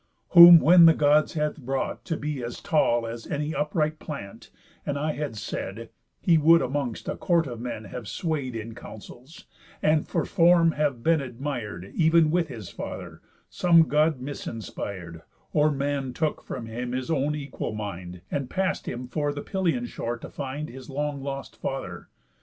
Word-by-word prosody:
Whom 170 -1 +11
when 170 +2 +7
the 165 - +6
Gods 150 +1 +3
had 150 0 -1
brought 135 +1 -3
to 165 -3 -2
be 145 -3 -4
as 120 0 -6
tall 120 -7 +1
As 115 0 -7
any 150 +1 -2
upright 155 +1 -1
plant, 100 -11 -8 0.3
and 145 - -2
I 155 +2 -1
had 145 -6 -4
said, 105 +2 -6 0.3
He 165 -3 +4
would 165 +2 +6
amongst 135 -3 -3
a - - -2
court 170 -3 +1
of 120 -4 -7
men 120 -3 -5
have 115 +1 -8
sway'd 145 - -3
In 115 0 -6
counsels, 125 +5 -12 0.3
and 155 0 +2
for - - -1
form 170 -2 +4
have 145 -6 -1
been 165 -2 +3
admir'd 120 - -6
Ev'n 160 -1 +4
with 175 -1 +1
his 115 - -8
father, - - -8 0.3
some 170 -2 +4
God 150 0 +2
misinspir'd, 100 - -6 0.3
Or 150 0 +4
man 140 -2 -2
took 155 +3 -1
from 125 -3 -6
him 120 +2 -5
his 130 +4 -3
own 150 0 0
equal 140 -6 -5
mind, 90 -4 -6
And 140 -3 -2
pass'd 190 0 -1
him 125 +1 -5
for 145 +4 -1
the 145 0 -6
Pylian 190 +5 -1
shore 120 - -4
to - - -10
find 145 +2 -5
His 130 +1 -11
long 145 0 -3
lost 135 0 -6
father. 95 -11 -5
140 Hz, 170 wpm, -26 LUFS, 120-155 Hz, 0.3 s, Whom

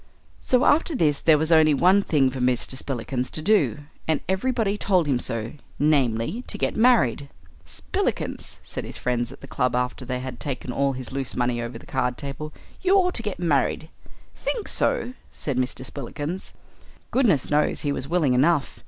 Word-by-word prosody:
So 255 +2 +2
after 315 +1 +3
this 150 - +2
there 160 -2 +5
was 160 +2 -1
only 155 -2 +6
one 185 +7 +5
thing 140 -8 +2
for 130 - -6
Mr. 125 +1 0
Spillikins 130 -1 -3
to - - -4
do, 210 -7 +2 0.3
and 160 -3 +2
everybody 210 +1 0
told 185 -5 +2
him 135 -4 +1
so 115 -3 -1 0.2
namely 145 - +1
to - - -2
get - - -1
married. 185 - +3 0.4
"Spillikins," - - -3
said - - -4
his - - -8
friends 120 -1 -1
at 135 - -13
the 135 - -10
club 125 -2 0
after 125 +1 -1
they 125 0 -3
had 130 0 -6
taken 130 -3 -4
all 140 +2 +1
his 130 -2 -7
loose 135 -1 -2
money 120 -1 0
over 120 0 -5
the - - -14
card 125 -2 -1
table, 145 +2 -6 0.3
"you 375 +1 +3
ought 360 -2 +3
to - - -1
get 210 -4 -4
married." 155 -1 0 0.4
"Think 450 -4 -3
so?" 485 - +1 0.2
said 140 -4 -4
Mr. 130 0 -2
Spillikins. 145 +7 -6 0.6
Goodness 205 - +2
knows 150 +1 +2
he 145 - -1
was 135 -1 -3
willing 160 -5 +2
enough. 145 +3 +2
145 Hz, 180 wpm, -24 LUFS, 125-180 Hz, 0.6 s, only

